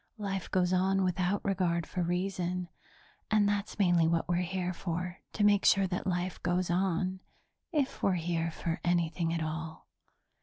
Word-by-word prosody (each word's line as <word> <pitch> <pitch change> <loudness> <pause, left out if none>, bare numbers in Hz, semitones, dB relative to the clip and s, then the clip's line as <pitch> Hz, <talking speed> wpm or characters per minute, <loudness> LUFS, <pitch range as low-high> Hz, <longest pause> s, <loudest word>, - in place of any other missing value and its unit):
Life 195 -3 -3
goes 185 -1 +2
on 190 +1 +2
without 185 +2 0
regard 175 -4 +1
for 180 - -3
reason, 180 0 -1 0.6
and 215 -2 +4
that's 205 0 -1
mainly 175 -5 +4
what 165 0 +1
we're 175 - +1
here 180 0 -1
for, 180 +1 -4
to 210 - 0
make 205 -1 +5
sure 195 -1 +5
that 180 0 -3
life 180 0 -2
goes 180 0 0
on 185 +1 0 0.5
if 290 -5 -1
we're 195 - +3
here 165 -1 -1
for 165 +1 -3
anything 170 -1 +1
at 165 -1 -1
all. 160 0 -5
180 Hz, 160 wpm, -31 LUFS, 170-195 Hz, 0.6 s, make